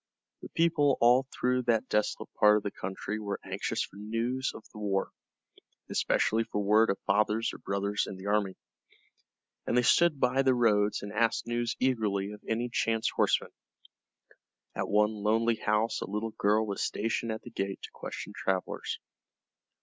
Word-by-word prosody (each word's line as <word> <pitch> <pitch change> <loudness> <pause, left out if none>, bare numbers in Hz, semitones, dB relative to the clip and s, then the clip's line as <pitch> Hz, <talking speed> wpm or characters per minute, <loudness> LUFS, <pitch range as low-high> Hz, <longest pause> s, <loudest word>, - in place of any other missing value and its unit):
The - - -9
people 155 -5 +2
all 125 +3 +5
through 125 0 +1
that 115 +1 +2
desolate 105 0 -1
part 105 0 +5
of 105 - -3
the 100 - -3
country 95 +3 -5
were 100 -2 -4
anxious - - -2
for 100 - -11
news 115 +5 -2
of - - -10
the 105 - -9
war, 100 -2 -1 0.8
especially 115 +1 +2
for 105 - -3
word 105 +2 +4
of 100 - +1
fathers 105 +2 +1
or - - -9
brothers 100 +1 -1
in 95 - -7
the 95 - -10
army, 100 -2 +1 1.1
and 120 - +1
they 125 - +4
stood 155 +3 +4
by 125 +2 +3
the 130 -1 +3
roads 105 -4 +2
and 100 0 -6
asked 115 +1 +1
news 120 0 -1
eagerly 105 -6 0
of 105 - -10
any 115 +2 0
chance 115 -2 0
horseman. - - +1 1.2
At - - -2
one 105 +1 +3
lonely 110 +2 +1
house 105 +2 0
a - - -5
little 105 +2 -2
girl 105 +1 +2
was 100 -2 -3
stationed 115 +1 -1
at 110 - -5
the - - -10
gate 95 0 -4
to - - -7
question - - -7
travelers. 95 -1 -2
110 Hz, 170 wpm, -30 LUFS, 105-120 Hz, 1.2 s, all